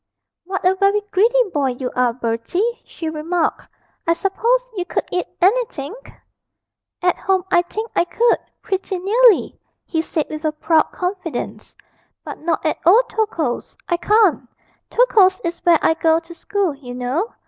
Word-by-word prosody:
'What 375 0 -1
a 370 - +4
very 395 +2 +2
greedy 475 +6 +4
boy 275 -4 +1
you 250 0 -4
are, 250 -1 +2
Bertie,' 240 - -2
she 330 - -7
remarked; 320 +2 -2 0.4
'I 335 - +5
suppose 475 +8 0
you 365 - -1
could - - -3
eat 360 - -1
anything?' 380 - +1 1.1
'At 360 -1 +2
home 380 -1 +1
I 350 - +5
think 435 +6 -6
I - - +3
could, 470 +6 +2 0.2
pretty 385 -1 -2
nearly,' 430 +4 +3 0.3
he 325 -3 -1
said, 320 -1 -2
with 310 0 -7
a 310 -1 0
proud 315 +1 +2
confidence, 360 -2 -5 0.5
'but - - -7
not 325 0 -2
at 310 - 0
old 435 +9 +5
Tokoe's, 335 - -2
I 345 - +1
can't. 380 - +2 0.4
Tokoe's 395 -6 +4
is 340 0 -4
where 340 -2 +6
I - - +4
go 325 0 +2
to 335 +1 -13
school, 395 -1 -1
you 255 -3 -9
know. 260 - -2
355 Hz, 160 wpm, -20 LUFS, 315-405 Hz, 1.1 s, where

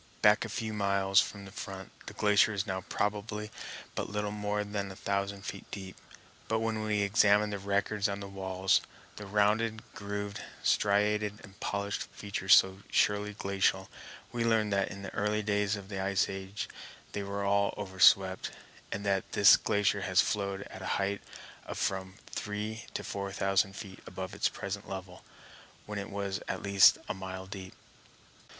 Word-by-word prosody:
Back 105 +1 +6
a 115 - -5
few 110 +1 -3
miles 100 -1 +3
from 100 -1 -6
the 95 - -10
front, 100 -3 -7 0.2
the - - -7
glacier 105 +1 +4
is 100 0 -1
now 95 -2 -2
probably 105 +1 -2 0.4
but - - -3
little 105 0 -2
more 105 0 -1
than 100 -1 -3
a - - -9
thousand 100 0 -2
feet - - -7
deep; 95 -2 -7 0.5
but 110 - +1
when 110 -1 -1
we 105 -1 +1
examine 105 0 +4
the 100 - -3
records 100 +1 0
on 100 0 -3
the 100 - -6
walls, 95 -1 +1 0.4
the 105 - -7
rounded, 105 +2 +2
grooved, 100 0 -4 0.2
striated, 105 0 +2
and 100 -1 -14
polished 100 0 -2
features 100 -2 +4
so 95 0 +4
surely 105 0 +2
glacial, 95 -1 +1 0.4
we 120 -1 -1
learn 110 -2 +2
that 100 -1 +1
in 100 0 -8
the 100 - -6
earlier 105 +1 0
days 105 0 +1
of 100 -2 -8
the 95 -1 -4
ice 95 0 +2
age 95 +1 -5 0.4
they 100 - -3
were 100 0 -3
all 100 0 +3
over 95 -2 -6
swept, 95 0 +5 0.4
and 100 +1 -3
that 95 -2 0
this 100 -2 +8
glacier 100 0 +1
has 95 -1 +2
flowed 100 -2 +1
at 95 - -9
a 95 - -4
height 100 0 -1 0.5
of - - -5
from 95 -1 -2
three 105 +2 -4
to - - -2
four 100 -1 -4
thousand 95 0 +1
feet 100 -4 -8
above 95 0 -6
its - - +1
present 100 0 -5
level, 95 -1 -7 0.6
when 105 -1 -4
it 100 - -5
was 100 -1 -3
at - - -3
least 100 -1 +7
a - - -1
mile 95 0 -6
deep. 95 -1 -8
100 Hz, 175 wpm, -31 LUFS, 95-105 Hz, 0.6 s, this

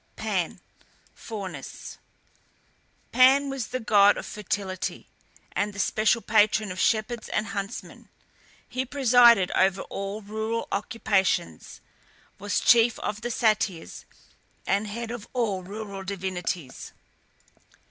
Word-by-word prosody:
PAN - - -2 0.5
(FAUNUS). 200 -5 -8 1.1
Pan 270 +2 +5
was 270 -4 -4
the 255 - -3
god 205 -3 +5
of - - -6
fertility, 195 -2 -4 0.4
and 205 +1 -1
the - - -11
special 215 +3 +2
patron 215 -1 +3
of 185 - -6
shepherds 220 +2 0
and 215 - -1
huntsmen; 200 +2 -6 0.6
he 255 - -2
presided 245 -7 +5
over 190 0 +2
all 200 +2 -4
rural 220 +2 -3
occupations, 195 - -1 0.6
was 205 +1 0
chief 235 -1 +5
of 210 +1 -4
the 240 - -3
Satyrs, 215 -7 -1 0.6
and 200 +2 0
head 230 +2 -5
of 240 -3 -7
all 220 -7 -1
rural 200 +1 -7
divinities. 180 -6 -5
210 Hz, 110 wpm, -26 LUFS, 195-230 Hz, 1.1 s, Pan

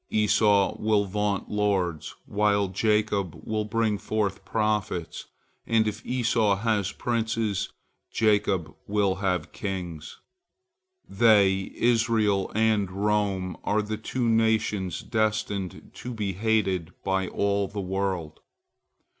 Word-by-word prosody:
Esau 105 -2 +3
will 105 -1 +2
vaunt 100 0 -1
lords, 95 -6 0
while 100 -1 +1
Jacob 105 -2 0
will 110 -1 -2
bring 110 -1 0
forth 105 -3 -2
prophets, 105 -6 -2 0.4
and 110 -1 +3
if 105 +1 -4
Esau 115 -4 +1
has 105 -2 0
princes, 115 -4 -1 0.4
Jacob 100 -7 +1
will 100 -2 +1
have 90 -5 -1
kings. 90 -6 -5 0.9
They, 100 -3 +3
Israel 115 -4 +2
and 110 -3 +2
Rome, 100 -2 0
are 105 +1 +1
the 110 +1 -4
two 120 +3 -2
nations 110 -4 +1
destined 105 -4 -2
to 125 - -7
be 105 -3 -2
hated 95 -4 0
by 95 -1 0
all 100 +1 0
the 100 - -6
world. 95 -4 -2
105 Hz, 110 wpm, -26 LUFS, 95-110 Hz, 0.9 s, Esau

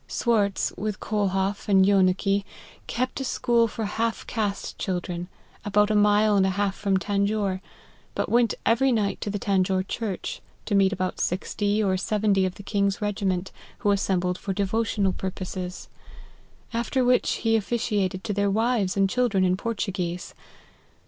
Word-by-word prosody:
Swartz, 210 -5 +1
with 210 0 -3
KolhofF 200 -1 -1
and 190 -1 +6
Jcenicke, 195 +1 +3 0.4
kept 255 +3 -2
a - - -2
school 240 -2 +2
for 220 0 -4
half 225 +2 -2
caste 210 -3 -3
children, 180 -2 -3 0.4
about 210 +1 +2
a - - +2
mile 210 0 +4
and 195 - +4
a 190 - +2
half 200 +1 0
from 200 -2 +1
Tanjore; 200 -1 0 0.5
but - - -1
went 235 -2 +3
every 260 +4 +3
night 210 -4 0
to - - -2
the 205 - -2
Tanjore 190 -1 +1
church, 215 -6 -4 0.2
to 210 - -3
meet 195 -1 +4
about 185 -2 -2
sixty 205 +3 0
or 190 -2 +1
seventy 200 -1 +1
of 185 - -6
the 200 - -10
king's 200 -1 0
regiment, 195 -3 -1 0.3
who 205 - +3
assembled 185 -2 0
for 195 - -3
devotional 200 0 0
purposes: 185 -1 -5 0.9
after 245 +2 0
which 250 0 +3
he 225 0 +4
officiated 205 -4 -1
to 210 - -2
their 200 0 +1
wives 215 -2 +1
and 195 0 +4
children 210 -4 +1
in 180 0 +2
Portuguese. 185 -5 -3
200 Hz, 155 wpm, -25 LUFS, 190-215 Hz, 0.9 s, and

